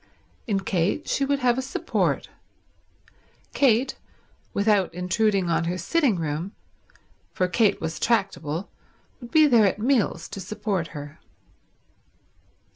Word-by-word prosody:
In 200 -3 0
Kate 190 - -1
she 275 - +1
would 280 +1 +1
have 245 +1 +3
a - - 0
support. 265 - -1 1.3
Kate, 260 -1 +2 0.5
without 200 -2 +2
intruding 190 +1 +1
on 170 0 +1
her 175 +2 -2
sitting 250 - +1
room, 165 +4 -3 0.8
for 185 - +1
Kate 205 +2 +2
was 160 0 -4
tractable, 195 -7 -1 0.5
would 240 -3 -10
be 310 +2 +5
there 235 -7 +5
at 195 - -1
meals 220 -7 +1
to - - -7
support 200 -2 -3
her. 145 +1 -9
200 Hz, 120 wpm, -25 LUFS, 175-235 Hz, 1.3 s, be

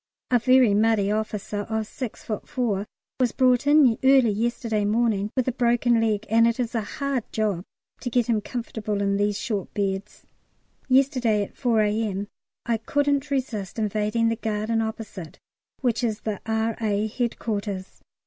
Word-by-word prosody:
A 245 - +5
very 255 -2 +5
muddy 210 -1 +3
officer 210 -1 -2
of 220 -1 -1
6 240 +1 -7
ft. 215 -2 -4
4 215 -6 -1 0.3
was 250 -3 +2
brought 255 +1 +3
in 290 -6 +5
early 265 -4 +5
yesterday 225 0 -1
morning 210 -1 +1
with 255 -2 0
a - - +2
broken 240 -1 +2
leg, 215 -1 0
and 230 +1 +4
it 235 +1 0
is 235 -2 -1
a 230 - 0
hard 275 +3 -2
job 205 -5 -1 0.4
to 245 - -4
get 245 0 +2
him 220 -2 +1
comfortable 220 -3 -4
in 200 0 +1
these 205 0 +1
short 205 -4 -3
beds. 200 0 -3 0.6
Yesterday 255 -5 +3
at - - -10
4 235 -5 +2
A.M. 210 -1 -1 0.4
I 230 -1 +1
couldn't 285 +4 0
resist 240 -9 -3
invading 215 +1 +1
the 230 - 0
garden 220 0 -1
opposite 220 -6 -6 0.4
which 240 -3 0
is 220 -3 -1
the 215 -3 -4
R.A. 220 -2 0
Headquarters. 210 -4 -3
225 Hz, 160 wpm, -25 LUFS, 210-240 Hz, 0.6 s, A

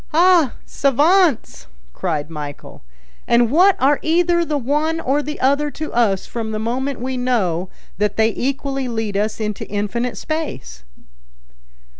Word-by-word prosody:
"Ah, 340 -5 +5
savants!" 300 - +2 0.3
cried 155 -4 -3
Michel; 145 -2 -8 0.5
"and 235 -1 +3
what 370 +6 +5
are 275 +2 +3
either 345 +1 +2
the 310 -3 -1
one 300 +5 0
or 285 -1 0
the 300 +1 -6
other 280 +3 +2
to 310 +1 -6
us 215 -5 +1
from 230 -2 -5
the 215 - -3
moment 255 +5 -2
we 255 +1 -3
know 190 -9 0 0.3
that 210 -1 0
they 220 0 +3
equally 275 0 -2
lead 225 -4 -3
us 215 +2 -1
into 210 -2 -4
infinite 210 +4 -2
space?" 285 - -5
255 Hz, 140 wpm, -19 LUFS, 215-295 Hz, 0.5 s, Ah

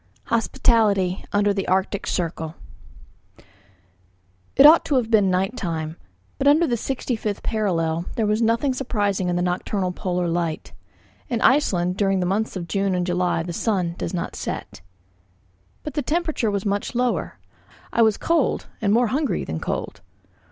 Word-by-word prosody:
HOSPITALITY 210 -5 +2
UNDER 205 0 +2
THE 195 -1 -3
ARCTIC 190 +2 0
CIRCLE 165 -2 -3 2.0
It 270 - +7
ought 315 +3 +8
to 290 - 0
have 240 -3 0
been 205 -4 +4
night 190 +5 0
time, 160 -7 -3 0.4
but 275 - +1
under 305 +4 +5
the 250 - -1
65th 230 -4 -3
parallel 170 -7 0
there 225 - +1
was 210 +2 +1
nothing 230 +4 +2
surprising 205 -8 -1
in 175 - 0
the 175 - 0
nocturnal 180 +1 -1
polar 180 -1 -2
light. 165 -2 -2 0.6
In 235 - -1
Iceland 180 -10 +2
during 195 -2 +2
the 180 - 0
months 205 +5 -1
of 175 -2 -5
June 195 +2 0
and 180 -1 0
July 180 -2 0
the 175 0 -5
sun 180 -3 0
does - - -3
not 180 -3 -4
set. - - -6 1.0
But 300 - -6
the 295 - -1
temperature 315 -4 -1
was 200 -1 -2
much 200 +3 -2
lower. 245 0 -1 0.6
I 235 - +3
was 220 -2 +4
cold 330 -6 +1 0.2
and 205 -2 +2
more 235 +1 +3
hungry 280 +3 0
than 80 - -4
cold. - - -4
200 Hz, 160 wpm, -23 LUFS, 180-235 Hz, 2.0 s, ought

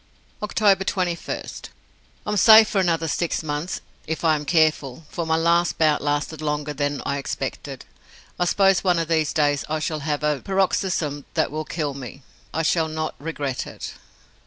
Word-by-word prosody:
October 205 -2 +2
21st. 180 -3 -3 0.6
I - - -4
am - - 0
safe 220 +2 +8
for 195 - +1
another 165 -3 +1
six 165 +1 -1
months 150 +3 -3 0.3
if 160 +2 -3
I 160 - +5
am 150 -1 -2
careful, 155 -3 +1
for 170 -2 -3
my 160 - +2
last 170 +1 +2
bout 155 -2 +3
lasted 145 +2 -2
longer 150 -1 -2
than 145 0 -2
I 140 0 -1
expected. 140 - -5 0.5
I 175 - +2
suppose 195 +1 +3
one 180 -2 +3
of 165 -1 -1
these 160 -2 +1
days 145 -3 +1
I 155 - 0
shall 155 0 -2
have 150 0 -2
a 150 -2 +1
paroxysm 185 -6 0
that - - +1
will 155 +1 -4
kill 150 -4 -3
me. 135 0 -9 0.3
I 160 - -1
shall 160 0 +2
not 155 0 -3
regret 145 -4 -4
it. - - -7
160 Hz, 175 wpm, -23 LUFS, 150-175 Hz, 0.6 s, safe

